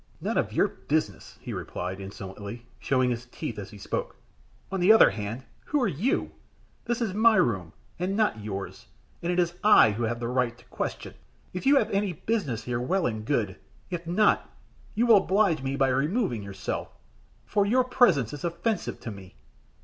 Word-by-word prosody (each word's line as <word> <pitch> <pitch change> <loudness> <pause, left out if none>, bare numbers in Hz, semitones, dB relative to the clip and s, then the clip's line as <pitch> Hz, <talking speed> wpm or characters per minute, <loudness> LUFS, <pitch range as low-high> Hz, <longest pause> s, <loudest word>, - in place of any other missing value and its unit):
"None - - -2
of - - 0
your - - +3
business," - - -3
he - - -6
replied, 90 +2 -5
insolently, 100 +4 -8
showing 130 -2 +1
his 120 +1 -4
teeth 120 -3 -6
as 100 -1 -7
he 105 - -12
spoke. 100 - -4 0.6
"On 195 - -1
the 180 +4 +6
other 220 - +8
hand, 110 +4 -5 0.2
who 295 - 0
are 245 - +2
you? 195 - 0 0.5
This 240 +1 -1
is 205 -5 -2
my 220 +2 +5
room, 95 - +1 0.3
and 190 +3 -1
not 160 - +1
yours, 100 -10 -6 0.3
and 170 - -1
it 180 - -1
is 175 -1 +2
I 210 - +7
who 105 +3 -4
have 115 +1 -2
the 120 - -3
right 125 -1 0
to 120 - -20
question. - - -4 0.4
If 185 +8 -3
you 285 - +7
have 230 - +2
any 195 -2 0
business 155 - -2
here, 120 -1 -2
well 185 +9 0
and 110 -3 -2
good. 110 -7 -1 0.3
If 170 -1 -4
not, 210 +5 +2 0.5
you 230 +3 +3
will 230 -3 +7
oblige 190 -4 +2
me 135 +1 -2
by 135 -1 +2
removing 140 - 0
yourself, 100 -1 -5 0.6
for 205 -1 +1
your 255 +4 +4
presence 185 - +3
is 145 - -7
offensive 175 +5 -2
to 115 - -5
me." 95 - -12
140 Hz, 190 wpm, -27 LUFS, -, 0.6 s, other